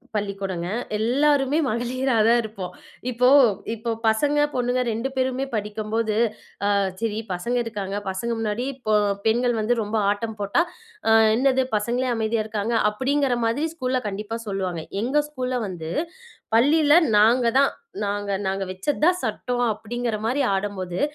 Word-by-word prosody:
பள்ளிக்கூடம்ங்க. 195 Hz, -4 st, -3 dB, 0.3 s
எல்லாருமே 275 Hz, +5 st, +2 dB
மகளிராதான் 240 Hz, -1 st, +2 dB
இருப்போம். 195 Hz, -4 st, -6 dB, 0.4 s
இப்போ 250 Hz, +1 st, +2 dB, 0.5 s
இப்ப 230 Hz, +1 st, -3 dB
பசங்க, 285 Hz, +7 st, +2 dB, 0.2 s
பொண்ணுங்க 250 Hz, 0 st, 0 dB
2 230 Hz, +4 st, -2 dB
பேருமே 260 Hz, +1 st, 0 dB
படிக்கும்போது, 215 Hz, +1 st, -2 dB, 0.5 s
அ -, -, +2 dB, 0.3 s
சரி 220 Hz, -1 st, -1 dB
பசங்க 235 Hz, +8 st, -2 dB
இருக்காங்க, 200 Hz, -3 st, -4 dB
பசங்க 190 Hz, +5 st, -2 dB
முன்னாடி 220 Hz, +3 st, -2 dB, 0.2 s
பொ 215 Hz, -, +3 dB, 0.3 s
பெண்கள் 240 Hz, +2 st, +2 dB
வந்து 235 Hz, +3 st, +1 dB
ரொம்ப 215 Hz, +1 st, -2 dB
ஆட்டம் 220 Hz, +1 st, -4 dB
போட்டா, 200 Hz, +11 st, +2 dB, 0.5 s
அ -, -, +5 dB, 0.2 s
"என்னது? 260 Hz, +1 st, +3 dB
பசங்களே 240 Hz, +5 st, 0 dB
அமைதியா 220 Hz, 0 st, 0 dB
இருக்காங்க." 220 Hz, +1 st, -2 dB, 0.2 s
அப்படிங்கிற 265 Hz, +2 st, +1 dB
மாதிரி 285 Hz, +8 st, 0 dB
ஸ்கூல்ல 255 Hz, -3 st, -1 dB
கண்டிப்பா 210 Hz, +3 st, -4 dB
சொல்லுவாங்க. 185 Hz, -5 st, -3 dB, 0.2 s
எங்க 275 Hz, +6 st, +2 dB
ஸ்கூல்ல 255 Hz, -3 st, -2 dB
வந்து 165 Hz, -3 st, -6 dB, 0.6 s
பள்ளியில, 290 Hz, +5 st, +4 dB, 0.2 s
"நாங்க 235 Hz, +4 st, +5 dB
தான், 280 Hz, -, +4 dB, 0.3 s
நாங்க 205 Hz, 0 st, -2 dB, 0.2 s
நாங்க 195 Hz, 0 st, -1 dB
வச்சது 190 Hz, +12 st, -3 dB
தான் 360 Hz, +1 st, +3 dB
சட்டம்." 245 Hz, +3 st, -1 dB
அப்படிங்கிற 225 Hz, +1 st, -3 dB
மாரி 275 Hz, +4 st, +1 dB
ஆடும்போது, 190 Hz, -3 st, -3 dB
230 Hz, 135 wpm, -23 LUFS, 205-255 Hz, 0.6 s, அ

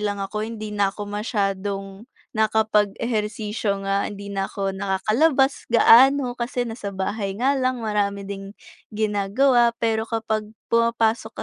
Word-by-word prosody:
lang 205 Hz, -1 st, -1 dB
ako 210 Hz, +2 st, -4 dB
hindi 215 Hz, -2 st, -6 dB
na 200 Hz, -1 st, +2 dB
ako 205 Hz, -, -6 dB
masyadong, 200 Hz, -1 st, -3 dB, 0.3 s
nakapag-ehersisyo 215 Hz, -1 st, 0 dB
nga, 195 Hz, 0 st, 0 dB
hindi 200 Hz, 0 st, -8 dB
na 195 Hz, -1 st, -2 dB
ako 195 Hz, -1 st, -2 dB
nakakalabas 250 Hz, +9 st, +1 dB
gaano 250 Hz, +2 st, +6 dB
kasi 245 Hz, 0 st, -2 dB
nasa 210 Hz, -3 st, -6 dB
bahay 195 Hz, +1 st, -2 dB
nga 270 Hz, +4 st, +2 dB
lang, 255 Hz, -1 st, 0 dB
marami 200 Hz, -2 st, -1 dB
ding, 195 Hz, 0 st, -7 dB, 0.4 s
ginagawa. 220 Hz, +4 st, +2 dB
Pero 220 Hz, -1 st, +1 dB
kapag 220 Hz, -1 st, -2 dB, 0.2 s
pumapasok 230 Hz, -1 st, +1 dB
215 Hz, 125 wpm, -23 LUFS, 200-230 Hz, 0.4 s, gaano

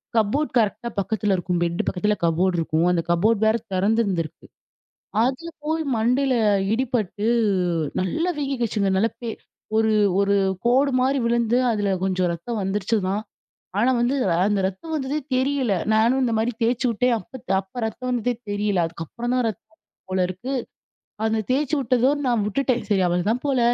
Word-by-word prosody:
Cupboard 230 Hz, +8 st, +1 dB
கரெக்ட்டா 230 Hz, +1 st, 0 dB
பக்கத்தில 205 Hz, 0 st, 0 dB
இருக்கும். 180 Hz, -1 st, -1 dB
பெட்டு 170 Hz, 0 st, 0 dB
பக்கத்தில 210 Hz, +3 st, +1 dB
கபோர்ட் 175 Hz, +3 st, +2 dB
இருக்கும். 160 Hz, +1 st, +1 dB
அந்த 175 Hz, -2 st, +1 dB
கபோர்ட் 200 Hz, +6 st, +2 dB
வேற 220 Hz, +1 st, +3 dB, 0.2 s
தெறந்திருந்திருக்கு. 195 Hz, -4 st, 0 dB, 0.8 s
அதில 260 Hz, +7 st, -1 dB, 0.2 s
போய் 320 Hz, +1 st, 0 dB
மண்டையில 250 Hz, +4 st, +2 dB, 0.4 s
இடிபட்டு 225 Hz, -4 st, -1 dB, 0.7 s
நல்லா 320 Hz, -, 0 dB
வீங்கிகிச்சுங்க. 240 Hz, -8 st, -1 dB
நல்லா 220 Hz, +4 st, +2 dB
பெ 235 Hz, -, -5 dB, 0.5 s
ஒரு-ஒரு 205 Hz, -3 st, +3 dB, 0.3 s
கோடுமாரி 260 Hz, +1 st, +3 dB
விழுந்து, 235 Hz, 0 st, +2 dB
அதில 205 Hz, -3 st, 0 dB, 0.2 s
கொஞ்சம் 185 Hz, -1 st, +1 dB
ரத்தம் 210 Hz, +7 st, -4 dB
வந்துருச்சு 195 Hz, +3 st, 0 dB
தான். 200 Hz, +3 st, -1 dB, 0.6 s
ஆனா, 250 Hz, -, +3 dB
வந்து, 240 Hz, +3 st, +1 dB, 0.3 s
அந்த 205 Hz, -1 st, +1 dB
ரத்தம் 195 Hz, -, -7 dB
வந்ததே 285 Hz, +1 st, -1 dB, 0.2 s
தெரியல. 260 Hz, -3 st, +1 dB, 0.2 s
நானும் 230 Hz, +4 st, +3 dB
இந்தமாரி 230 Hz, -1 st, +1 dB
தேச்சு 235 Hz, +2 st, +1 dB
உட்டேன். 245 Hz, +3 st, +1 dB
அப்பத் 245 Hz, +3 st, -9 dB
அப்ப 195 Hz, +6 st, -7 dB
ரத்தம் 250 Hz, +3 st, -4 dB
வந்ததே 245 Hz, 0 st, 0 dB, 0.2 s
தெரியல. 205 Hz, -2 st, 0 dB
அதுக்கப்புறந்தான் 235 Hz, +10 st, -3 dB
ரத்தம் 215 Hz, 0 st, -9 dB
வந்திருக்கும் 210 Hz, -1 st, -38 dB
போல 185 Hz, -1 st, +2 dB
இருக்கு. 220 Hz, +9 st, -5 dB, 0.7 s
அந்த 220 Hz, 0 st, +1 dB
தேச்சு 290 Hz, +2 st, +1 dB
உட்டதோட 255 Hz, +3 st, +2 dB
நான் 235 Hz, -4 st, +1 dB
விட்டுட்டேன். 250 Hz, +2 st, 0 dB
சரி 195 Hz, -2 st, +3 dB
அவளதான் 185 Hz, +8 st, 0 dB
போல. 270 Hz, -3 st, +1 dB
220 Hz, 140 wpm, -23 LUFS, 195-255 Hz, 0.8 s, வேற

